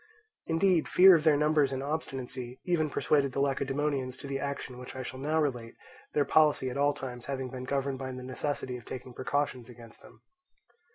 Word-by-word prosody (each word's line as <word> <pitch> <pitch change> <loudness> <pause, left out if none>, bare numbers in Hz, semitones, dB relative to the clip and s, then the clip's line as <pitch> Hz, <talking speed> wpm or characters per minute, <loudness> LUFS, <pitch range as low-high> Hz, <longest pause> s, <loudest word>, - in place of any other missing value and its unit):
Indeed 170 +1 +2
fear 190 +1 +8
of 160 -3 +3
their 155 -2 +5
numbers 150 -2 +3
and 135 0 -3
obstinacy 130 -4 -4
even 165 -4 +1
persuaded 140 -2 +1
the - - -2
Lacedaemonians 135 -1 -1
to - - -10
the 135 0 -3
action 135 -3 -5
which 125 - -9
I 130 - -4
shall 130 +1 -7
now 155 +3 0
relate, 125 -6 -2 0.4
their 145 -1 +3
policy 150 -4 +3
at - - -6
all 145 +1 +2
times 125 -2 -7
having 130 -2 -3
been 130 -1 -6
governed 135 0 -1
by 130 -1 -4
the 125 0 -7
necessity 130 0 -3
of 120 - -13
taking 130 -1 -7
precautions 130 -2 -2
against 115 -1 -14
them. - - -18
135 Hz, 190 wpm, -30 LUFS, 130-150 Hz, 0.4 s, fear